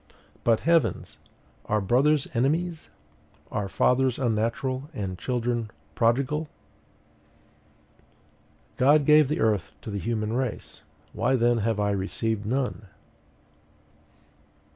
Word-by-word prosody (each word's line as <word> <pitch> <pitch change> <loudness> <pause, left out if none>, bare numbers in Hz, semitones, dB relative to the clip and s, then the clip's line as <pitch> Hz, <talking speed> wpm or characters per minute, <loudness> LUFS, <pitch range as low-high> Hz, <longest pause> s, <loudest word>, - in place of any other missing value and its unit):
But, 115 -2 +3
heavens! 165 -1 +1 0.5
are 105 - +1
brothers 135 +8 +2
enemies? 155 +7 -1 0.6
Are 100 -2 -2
fathers 125 +4 +2
unnatural, 130 +3 -1
and 95 -4 -3
children 120 0 -2 0.2
prodigal? 140 +6 +1 2.3
GOD 145 +3 +4
GAVE 150 -1 +6
THE 150 - -2
EARTH 105 -8 0
TO 110 - -6
THE 100 - -3
HUMAN 110 +1 -2
RACE: 125 -2 -4 0.3
why 120 +5 +1
then 120 -1 +2
have 110 0 -1
I 105 0 +1
received 105 +2 -2
none? 125 -4 -2
120 Hz, 100 wpm, -26 LUFS, 110-135 Hz, 2.3 s, GAVE